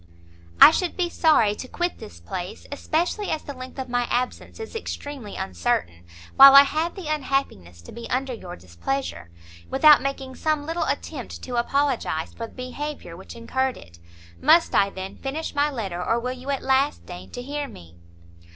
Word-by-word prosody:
"I - - +11
should 355 +1 -2
be 355 -2 0
sorry 235 -11 +4
to 255 - -8
quit 350 +6 -3
this 85 - -11
place, 175 - -7
especially 345 +8 -1
as 315 - -2
the 285 - -7
length 255 0 -10
of 265 -1 -4
my 245 -1 -1
absence 250 - -3
is 445 +1 -8
extremely 285 - -6
uncertain, 85 -1 -2 0.3
while 275 0 +11
I 275 - +11
have 315 +4 -2
the 375 -6 -7
unhappiness 260 - -3
to - - -12
be 235 - -9
under 260 0 -1
your 185 -6 -8
displeasure, 90 - -5 0.4
without 295 +2 +6
making 270 -1 -4
some 310 -2 0
little 330 +2 -2
attempt - - -5
to 250 - -5
apologize 250 - 0
for 230 - -6
the - - -19
behaviour 255 - -6
which 190 - -11
incurred 260 +3 -2
it. 85 0 -15 0.4
Must 320 +4 +5
I, 200 - +4
then, 190 0 -8
finish 295 +4 -4
my 290 0 +2
letter, 195 -10 -4
or 230 +5 +1
will 250 +2 -3
you 255 +2 -9
at 275 -1 -1
last 270 +2 +1
deign 180 -1 -10
to 245 - -6
hear 290 +2 -4
me?" 85 - -14
260 Hz, 180 wpm, -24 LUFS, 200-290 Hz, 0.4 s, I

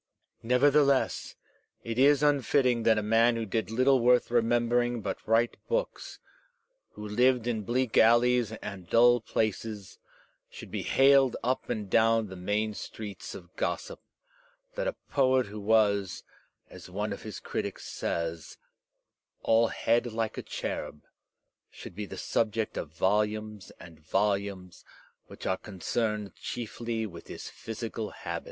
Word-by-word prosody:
Nevertheless, 140 +3 +2 0.5
it 115 +1 -3
is 145 +1 +5
unfitting 135 -4 +3
that 110 -1 +3
a 105 - 0
man 115 +2 +3
who 115 -1 -2
did 110 -1 -2
little 130 +4 +3
worth 125 0 +3
remembering 120 0 +2
but 100 - -4
write 115 +2 +2
books, - - -3 0.8
who 105 - -7
lived 125 +3 +2
in 115 -3 -1
bleak 120 +3 +1
alleys 120 0 +4
and 95 -4 -7
dull 120 +1 +5
places, 110 -2 -3 0.5
should - - -11
be - - -3
haled 135 -2 +4
up 130 +2 -1
and 110 -4 -3
down 115 +1 +3
the 95 - -8
main 105 +4 -1
streets 105 -2 -8
of 90 -1 -12
gossip; - - -3 0.7
that - - -2
a - - -2 0.2
poet 130 -2 +3
who 105 +1 -8
was, 100 -3 +2 0.4
as - - -12
one - - -3
of - - -8
his - - -7
critics - - -5
says, 85 -1 -4 0.9
all 115 +1 +4
head 120 +2 0
like 110 0 -2
a - - -4
cherub, 75 - -5 0.7
should - - -11
be 105 +2 -6
the 95 - -8
subject 110 +2 -1
of 80 - -4
volumes 105 +3 -1
and 80 -3 -13
volumes 95 +2 -2 0.4
which - - -11
are 95 - 0
concerned 105 +1 -3
chiefly 115 -1 -4
with 85 -5 -10
his - - -8
phjfeical 110 -1 -6
habits. - - -5
115 Hz, 140 wpm, -29 LUFS, 105-120 Hz, 0.9 s, is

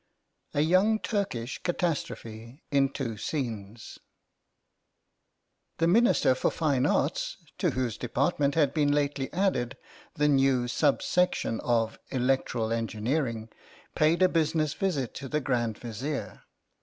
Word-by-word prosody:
A 145 - +3
YOUNG 185 +7 +4
TURKISH 145 - -2
CATASTROPHE 135 -8 -3
IN 140 -1 +3
TWO 115 -6 -4
SCENES 115 -7 -5 1.8
THE 165 - +2
Minister 215 - +4
for 130 - 0
Fine 140 -6 +1
Arts - - 0 0.2
(to - - +2
whose 125 -4 -1
Department 140 +3 0
had 145 -4 +3
been 145 -2 +2
lately 145 -2 0
added 170 -10 0 0.4
the 150 0 +2
new 135 -3 +3
sub 140 +3 +1
section 180 -10 +1
of 115 -2 0
Electoral 125 -3 0
Engineering) 115 +1 -2 0.4
paid 160 +4 +3
a - - +7
business 155 -3 +1
visit 150 - -1
to 135 -1 -7
the 150 - 0
Grand 120 -5 -1
Vizier. 125 +6 -5
135 Hz, 120 wpm, -28 LUFS, 120-155 Hz, 1.8 s, a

